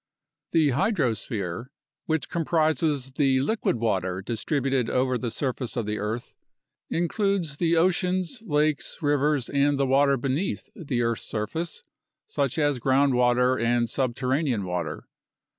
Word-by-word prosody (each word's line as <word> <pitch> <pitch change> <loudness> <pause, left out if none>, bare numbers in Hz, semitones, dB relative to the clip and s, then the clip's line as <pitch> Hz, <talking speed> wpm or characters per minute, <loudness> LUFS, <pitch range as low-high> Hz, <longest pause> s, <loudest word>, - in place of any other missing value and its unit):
The 160 -3 +4
hydrosphere, 120 - -1 0.4
which 160 -1 0
comprises 155 -4 +1
the 135 -1 +2
liquid 215 - 0
water 95 -5 -1
distributed 130 - -1
over 130 0 +1
the 120 -1 -2
surface 125 +1 -3
of 115 - -1
the 105 0 -2
earth, 110 +3 -4 0.6
includes 175 -3 0
the 170 0 +2
oceans, 185 +4 +1
lakes, 150 -1 +1
rivers, 145 -2 +2
and 140 0 +2
the 140 - +3
water 140 +1 +3
beneath 135 +9 -2
the 130 -7 -2
earth's 115 -1 -1
surface, 155 +11 -4 0.4
such 140 0 -1
as 145 -4 +1
groundwater 125 -2 +3
and 120 0 +2
sub 130 -3 -1
terranean 130 -4 0
water. 90 -3 -4
135 Hz, 125 wpm, -26 LUFS, 120-155 Hz, 0.6 s, The